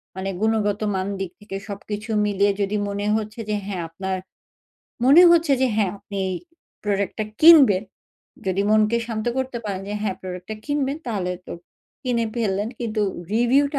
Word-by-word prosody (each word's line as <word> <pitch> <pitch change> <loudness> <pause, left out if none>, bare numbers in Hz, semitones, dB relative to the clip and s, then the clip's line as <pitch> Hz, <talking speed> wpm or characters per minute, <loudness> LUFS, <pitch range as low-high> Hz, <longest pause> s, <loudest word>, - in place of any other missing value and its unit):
মানে 190 +1 -3
গুণগত 215 -1 +1
মান 190 0 -1
দিক 190 -3 -3
থেকে 205 -2 -6
সবকিছু 210 +1 -6 0.2
মিলিয়ে 200 0 +2
যদি 200 +1 0
মনে 200 0 -3
হচ্ছে 220 +1 -4
যে, 210 - +1
হ্যাঁ, 195 -3 -3
আপনার 190 +3 -3 0.9
মনে 285 +7 +8
হচ্ছে 335 -3 +4
যে - - +5
হ্যাঁ, 205 -4 +2
আপনি 200 0 -6 0.6
প্রোডাক্টটা 200 +1 -1 0.2
কিনবেন। 285 - +8 0.6
যদি 190 +1 +1
মনকে 215 +2 +4
শান্ত 220 -1 -4
করতে 260 -2 -2
পারেন, 195 -2 -3
যে 205 - -3
হ্যাঁ 195 -3 -1
প্রোডাক্ট 180 -1 -7
টা 215 - -3
কিনবেন 290 -1 0
তাহলে 190 -6 -1
তো - - -6 0.5
কিনে 240 -3 0
ফেললেন। 205 -2 0
কিন্তু 220 -2 -1 0.3
রিভিউ 245 +5 +4
টা - - +1
210 Hz, 160 wpm, -23 LUFS, 195-235 Hz, 0.9 s, মনে